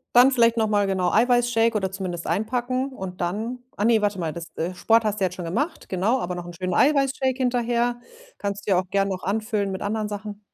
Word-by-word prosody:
Dann 250 +2 +8
vielleicht 235 -2 +3
noch 220 -1 +2
mal, 205 -1 +2
genau, 185 -2 +1
Eiweißshake 240 -1 +3
oder 190 -2 -2
zumindest 185 -3 -5
einpacken 255 +4 -1
und 190 -6 -7
dann 220 +8 -2 0.2
ach 205 - 0
ne, 225 -2 +4
warte 205 -2 0
mal, 160 -2 -2
das, 170 -1 -7
äh 175 +3 -2
Sport 225 +5 +3
hast 210 0 -1
du - - 0
jetzt 180 0 -3
schon 175 - -6
gemacht, 255 - -2
genau, 205 +8 +1
aber 180 -2 -3
noch 175 -1 -6
'n 175 - -8
schönen 185 +1 -3
Eiweißshake 270 - +2
hinterher. 240 -1 0 0.4
Kannst 200 0 -4
du - - +1
ja 180 - +5
auch 185 -1 -5
gern 200 0 +1
noch 185 -2 -3
anfüllen 210 0 -1
mit 190 +2 -4
anderen 215 +1 -2
Sachen. 205 0 -6
210 Hz, 230 wpm, -24 LUFS, 190-240 Hz, 0.4 s, Dann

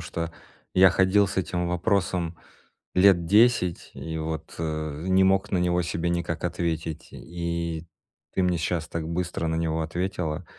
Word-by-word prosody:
что 85 0 -4 0.4
я 95 0 +7
ходил 95 +2 +4
с 95 - -6
этим 90 -1 -1
вопросом 90 -2 0 0.6
лет 90 -2 +5
10 105 -2 +3
и 80 0 -5
вот, 80 0 -5
э, 80 -1 -3
не 95 0 +4
мог 95 +2 +2
на 95 - +2
него 90 0 +2
себе 85 0 -2
никак 85 -1 -2
ответить 85 -2 -3
и 85 -1 -4 0.5
ты 95 - +1
мне 90 -1 +2
щас 80 0 -2
так 80 -1 -4
быстро 85 -1 -2
на 80 - 0
него 80 0 0
ответила. 85 -1 -3
85 Hz, 155 wpm, -26 LUFS, 80-90 Hz, 0.6 s, я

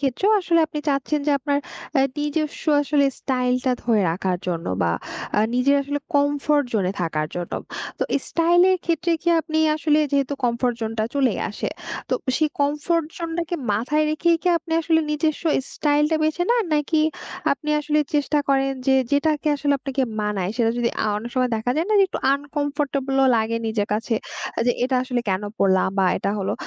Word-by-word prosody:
ক্ষেত্রেও 285 - +1
আসলে 335 -2 +2
আপনি 300 -1 -6
চাচ্ছেন 285 +2 0
যে - - +3
আপনার 285 +1 0 0.4
অ্যা 270 - +4 0.2
নিজস্ব 295 +1 -2 0.2
আসলে 285 0 +2 0.2
স্টাইলটা 255 0 0
ধরে 230 -3 +2
রাখার 180 +1 -1
জন্য 170 -2 -2 0.2
বা 85 - +2 0.5
আ - - +4 0.2
নিজের 275 +3 +3
আসলে 290 +1 -3 0.2
কমফোর্ট 285 0 +2
জোন 205 -4 +1
এ - - -4
থাকার 155 -2 -1
জন্য। 175 -1 -5 0.5
তো - - 0 0.3
স্টাইল 340 +1 +3
এর 370 - +3
ক্ষেত্রে 335 +1 0
কি 345 - 0
আপনি 315 -1 -2 0.2
আসলে 310 -1 +2
যেহেতু 280 0 +1
কমফোর্ট 240 0 +1
জোনটা 220 0 -2
চলেই 265 -6 +1
আসে। 210 - -3 0.4
তো - - +1 0.2
সেই 310 -1 +2
কমফোর্ট 300 +3 +1
জোনটাকে 335 0 -3 0.2
মাথায় 300 +9 +1
রেখেই 335 +2 +2
কি 360 - +1
আপনি 325 0 -8
আসলে 320 0 +2
নিজস্ব 305 +1 -1 0.3
স্টাইলটা 300 +1 +2
বেছে 315 +3 0
নেন? 475 -3 +3
নাকি 300 +2 +1 0.5
আপনি 300 +2 -6
আসলে 300 +1 0 0.2
চেষ্টা 295 +1 +2
করেন 270 0 +2
যে 265 - +5 0.2
যেটাকে 300 +1 +1
আসলে 285 0 0
আপনাকে 270 0 -2 0.2
মানায় 205 -3 -1
সেটা 230 -2 +2
যদি 235 -1 +2
আ - - 0
অনেক 235 +3 -7
সময় 255 -1 +1
দেখা 220 +3 -2
যায় 325 - +1
না? - - +1
যে 390 - +6
একটু - - -4 0.2
আনকম্ফোর্টেবল 285 -1 -2
ও - - +5
লাগে 225 +1 0
নিজের 215 -2 -1
কাছে 225 +2 -1 0.5
যে 245 - +4
এটা 260 0 +1
আসলে 250 -2 -1
কেনো 195 +2 -1
পড়লাম? 190 -1 +3
বা 190 - +4
এটা 200 - -1
হলো 190 - -1
280 Hz, 180 wpm, -22 LUFS, 240-305 Hz, 0.5 s, যে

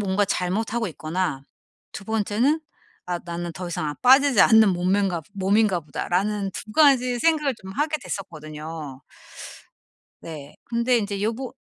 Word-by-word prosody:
뭔가 200 0 +1
잘못하고 220 +6 -1
있거나 160 -3 -3 0.5
2 195 - -8
번째는 225 +8 +1 0.5
'아 175 -1 -2
나는 170 0 -5
더 180 +1 -6
이상 155 -2 -3
안 145 - -5
빠지지 270 +1 +6
않는 220 -3 +6
몸매인가 180 0 0
몸인가 195 -1 +2
보다.'라는 195 +7 -2
2 215 - -8
가지 255 -4 +4
생각을 300 -2 +2
좀 190 0 -8
하게 300 +5 0
됐었거든요. 155 -5 -7 1.2
네. 150 -3 -9
근데 235 +1 +1
인제 200 -2 -3
여부 230 +4 -3
200 Hz, 285 characters per minute, -24 LUFS, 175-235 Hz, 1.2 s, 빠지지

